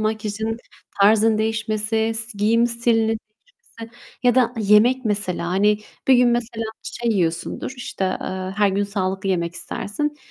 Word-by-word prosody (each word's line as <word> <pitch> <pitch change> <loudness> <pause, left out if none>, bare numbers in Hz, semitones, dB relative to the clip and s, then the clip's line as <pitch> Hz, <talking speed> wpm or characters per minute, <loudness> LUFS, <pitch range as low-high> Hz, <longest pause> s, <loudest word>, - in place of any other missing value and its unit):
makyajın 215 0 -2 0.4
tarzın 215 +2 +5
değişmesi, 220 0 0
si 220 -1 -2
giyim 230 +3 +3
stilinin 235 -1 +2 0.4
değişmesi 240 - -14 0.3
ya 245 -2 +4
da 250 -2 +3
yemek 220 +5 +4
mesela. 205 -5 -1
Hani, 205 +3 +2 0.3
bir 265 - +8
gün 245 -1 +5
mesela 235 -1 -1 0.2
şey 235 -1 -3
yiyorsundur, 170 +5 -2
işte, 240 -5 -4 0.2
eee, 185 0 -4
her 205 -1 +4
gün 200 +1 0
sağlıklı 195 -1 -2
yemek 170 -2 -1
istersin. 295 - -3
220 Hz, 140 wpm, -22 LUFS, 200-230 Hz, 0.4 s, bir